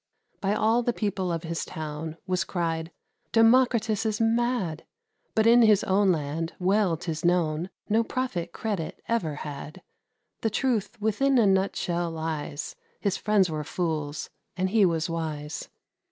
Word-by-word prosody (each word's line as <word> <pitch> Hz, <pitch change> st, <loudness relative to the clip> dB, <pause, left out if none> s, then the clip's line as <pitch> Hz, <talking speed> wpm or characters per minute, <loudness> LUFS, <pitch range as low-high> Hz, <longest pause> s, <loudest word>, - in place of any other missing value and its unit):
By 200 Hz, 0 st, 0 dB
all 225 Hz, +3 st, +3 dB
the 240 Hz, 0 st, 0 dB
people 195 Hz, -5 st, -1 dB
of 165 Hz, 0 st, -2 dB
his 165 Hz, 0 st, -3 dB
town 155 Hz, +1 st, -6 dB
Was 185 Hz, -1 st, 0 dB
cried, 165 Hz, -3 st, -2 dB, 0.4 s
"Democritus 225 Hz, -2 st, +4 dB
is 220 Hz, -1 st, -1 dB
mad!" 230 Hz, -7 st, +1 dB, 0.5 s
But 220 Hz, -1 st, +3 dB
in 235 Hz, +1 st, +7 dB
his 215 Hz, -3 st, +5 dB
own 195 Hz, 0 st, +3 dB
land, 160 Hz, +1 st, -2 dB
well 190 Hz, -2 st, +2 dB
'tis 160 Hz, -1 st, -4 dB
known, 170 Hz, -1 st, +1 dB, 0.2 s
No 220 Hz, +2 st, +3 dB
prophet 205 Hz, -9 st, -3 dB
credit 200 Hz, -7 st, -3 dB
ever 175 Hz, -11 st, 0 dB
had. 150 Hz, +4 st, -7 dB, 0.6 s
The 225 Hz, -, +1 dB
truth 235 Hz, -2 st, -1 dB
within 235 Hz, +6 st, +2 dB
a 230 Hz, -, +5 dB
nutshell 190 Hz, -3 st, +1 dB
lies: 160 Hz, -2 st, -4 dB, 0.2 s
His 200 Hz, -2 st, 0 dB
friends 205 Hz, -2 st, +3 dB
were 155 Hz, -1 st, -2 dB
fools, 155 Hz, -3 st, -3 dB, 0.3 s
and 185 Hz, 0 st, 0 dB
he 210 Hz, -3 st, +5 dB
was 165 Hz, -1 st, 0 dB
wise. 155 Hz, -3 st, -4 dB
185 Hz, 145 wpm, -27 LUFS, 160-220 Hz, 0.6 s, in